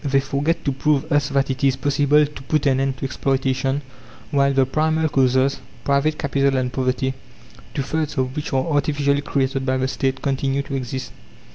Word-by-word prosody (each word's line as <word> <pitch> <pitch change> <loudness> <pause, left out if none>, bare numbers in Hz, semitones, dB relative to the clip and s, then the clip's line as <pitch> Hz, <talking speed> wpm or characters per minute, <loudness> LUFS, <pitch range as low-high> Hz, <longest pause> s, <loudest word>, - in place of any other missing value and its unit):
They 140 -1 +2
forget 140 +4 -1
to 140 - +2
prove 140 +1 0
us 145 -1 +2
that 140 -1 +1
it 130 +1 -5
is 135 -2 +4
possible 145 +2 +3
to 145 -2 -10
put 150 +2 0
an 135 -2 +3
end 135 -1 0
to 135 - -4
exploitation 135 +1 0 0.5
while 140 -1 +3
the 135 -1 +3
primal 160 +3 +1
causes 130 0 +2 0.2
private 140 +2 +1
capital 140 -1 +1
and 125 -1 -1
poverty, 130 0 0 0.6
two 140 - 0
thirds 155 +1 -2
of 130 0 -1
which 150 - -4
are 130 -1 +1
artificially 145 -2 +1
created 135 -2 -1
by 130 0 0
the 130 0 0
State 135 0 -2
continue 135 0 0
to 140 - -8
exist. 130 0 -4
135 Hz, 185 wpm, -21 LUFS, 130-145 Hz, 0.6 s, is